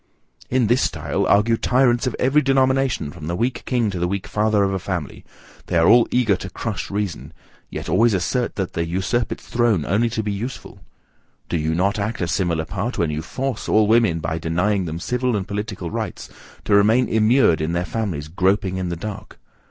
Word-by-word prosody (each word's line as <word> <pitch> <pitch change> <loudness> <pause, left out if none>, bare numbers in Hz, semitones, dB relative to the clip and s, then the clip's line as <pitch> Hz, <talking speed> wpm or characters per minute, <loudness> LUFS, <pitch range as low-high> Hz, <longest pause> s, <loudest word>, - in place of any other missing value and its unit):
In 125 -1 +2
this 120 +4 +2
style, - - -1
argue 115 +3 +3
tyrants 125 0 +2
of 125 - -2
every 135 +4 +3
denomination 130 - +1
from 75 -1 -9
the 85 - -2
weak 120 +6 -1
king 120 -5 0
to 90 - -4
the 90 - 0
weak 100 +1 -3
father 105 -1 +1
of 95 0 0
a 95 - -1
family; 90 -6 -5 0.4
they - - 0
are 80 0 +4
all 120 +3 +6
eager 120 -5 +2
to 95 - -7
crush 110 +3 -4
reason; 100 -4 -4 0.4
yet - - -6
always 110 +5 +3
assert 120 +7 -1
that 95 -3 -3
they - - -1
usurp 95 +7 -1
its - - -6
throne 115 -10 +1
only 110 +8 +1
to 110 -1 -2
be 105 - -2
useful. 115 +6 -6 0.7
Do 85 - 0
you 80 +1 -1
not 100 +4 +1
act 105 +3 -2
a 85 - -1
similar 85 -4 0
part, 105 +8 -4
when 85 -3 0
you 75 +1 -3
FORCE 130 +10 -4
all 110 0 +4
women, 110 -7 +3
by 80 +1 -2
denying 90 +5 0
them 80 0 -4
civil 125 +4 -1
and 95 -2 -3
political 100 -4 -4
rights, - - -5 0.4
to - - +1
remain 110 +5 +4
immured 110 -6 +3
in 80 +2 -1
their 85 +1 -1
families 85 -5 -3
groping 95 +3 0
in 90 -1 -2
the 85 - -2
dark? 100 +4 -8
100 Hz, 205 wpm, -21 LUFS, 85-120 Hz, 0.7 s, all